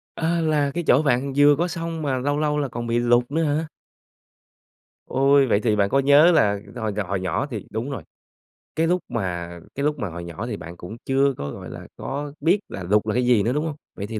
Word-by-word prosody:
À, 170 +1 0
là 150 -3 +1
cái 175 - -2
chỗ 135 - +5
bạn 135 -1 +1
vừa 145 0 +6
có 170 +5 0
sông 165 -2 -4
mà 135 -3 0
lâu 145 +3 -1
lâu 150 -1 +1
là 140 - -1
còn 120 -1 -5
bị 120 +1 +1
lụt 120 +2 +2
nữa 165 +2 +1
hả? 155 +2 0 1.4
Ôi. 135 +1 +3
Vậy 105 -3 +3
thì 110 -3 +2
bạn 100 -1 +2
có 135 - +3
nhớ 145 +5 +6
là 105 -11 +3 0.2
hồi 110 -4 -2
nhỏ- 100 -1 -2
nhỏ 95 -3 -1
thì - - -6
đúng 115 +5 -3
rồi, 115 - -5 0.7
cái 165 +1 +2
lúc 180 +1 +1
mà 90 -7 -3 0.3
cái 140 - -2
lúc 150 -1 0
mà 105 - -2
hồi 85 +1 -7
nhỏ 85 +6 -6
thì 105 -4 -4
bạn 85 +1 -10
cũng 90 +7 -9
chưa 135 +1 +2
có, 70 0 -4
gọi - - -8
là, - - -9
có 145 +1 -5
biết 175 +7 +3
là 95 - -6
lụt 105 +4 +3
là 105 - 0
cái 125 0 +1
gì 120 -5 +4
nữa, 120 - 0
đúng 150 +3 -1
hông? 155 - -3 0.2
Vậy 100 - -4
thì 110 -1 -4
135 Hz, 240 wpm, -23 LUFS, 105-150 Hz, 1.4 s, vừa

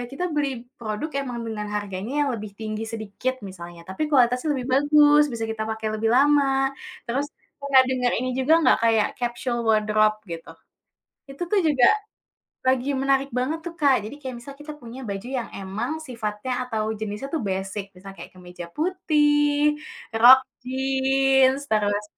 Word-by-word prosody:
kita 290 +7 -4
beli 275 -5 -2 0.2
produk 220 +7 -4
emang 245 -3 -5
dengan 210 -2 -4
harganya 205 +1 -4
yang 275 - 0
lebih 215 -2 -6
tinggi 215 0 -4
sedikit 225 +3 -3
misalnya, 175 -3 -9
tapi 190 - -3
kualitasnya 250 +1 +3
lebih 255 -1 -4
bagus, 295 +1 +5
bisa 230 -1 -4
kita 225 0 -3
pakai 220 0 -3
lebih 225 - -1
lama, 270 0 +3 0.3
terus 270 +5 -1 0.3
pernah 275 -2 +5
denger 255 -1 0
ini 255 +2 -2
juga 270 +5 +2
nggak, - - +5
kayak 225 -2 +3
capsule 240 0 -2
wardrobe 215 0 +3
gitu? 165 0 -7 0.8
Itu 275 - -7
tuh 420 - +3
juga 270 -5 +4 0.8
lagi 260 +2 +2
menarik 270 +1 +1
banget 265 +6 -1
tuh, 340 -1 -6
Kak, 275 -6 +4
jadi 235 - -9
kayak 260 -2 -5
misal 280 +3 -10
kita 295 +1 -8
punya 240 +2 -9
baju 200 +3 -5
yang 255 -3 -3
emang 215 +11 -4
sifatnya 230 -4 -5
atau 220 -3 -2
jenisnya 210 +4 -5
tuh 315 -2 -2
basic, 195 +1 -4
misalnya 195 +1 -12
kayak - - -13
kemeja 180 -1 -10
putih, 295 -4 +2 0.4
rok 255 +3 +9 0.2
jeans, 265 +1 +2
terus 205 -1 +1
250 Hz, 155 wpm, -24 LUFS, 215-275 Hz, 0.8 s, rok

